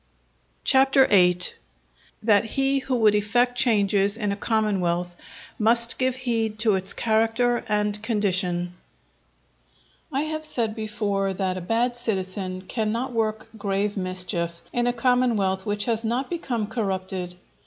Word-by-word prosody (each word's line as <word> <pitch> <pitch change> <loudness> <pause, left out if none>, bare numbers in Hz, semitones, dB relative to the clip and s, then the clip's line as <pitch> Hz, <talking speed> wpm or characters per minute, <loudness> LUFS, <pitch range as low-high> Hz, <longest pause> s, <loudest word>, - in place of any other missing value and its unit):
CHAPTER 270 0 +5
VIII.—That 200 +3 +1
he 270 +4 0
who 260 -1 -2
would 220 -3 +4
effect 240 +4 +2
Changes 205 -4 +3
in 210 -3 -1
a - - -1
Commonwealth, 185 -5 -1 0.4
must 230 +1 +4
give 255 -1 +1
heed 230 -4 -2
to 215 -1 +3
its 190 0 +1
Character 225 +2 +1
and 210 0 0
Condition 185 -5 0 1.4
I 275 0 0
have 310 0 -3
said 235 -8 -2
before 210 -3 -2
that 185 -1 -2
a 185 - -5
bad 230 +6 0
citizen 190 -4 -3
cannot 230 +5 -2
work 220 -1 -2
grave 200 +1 -1
mischief 180 -3 -3
in 240 0 0
a - - +3
commonwealth 230 -6 +1
which 205 0 -1
has 230 -1 0
not 240 +6 -2
become 250 -10 -2
corrupted. 190 -4 -3
215 Hz, 130 wpm, -24 LUFS, 195-240 Hz, 1.4 s, CHAPTER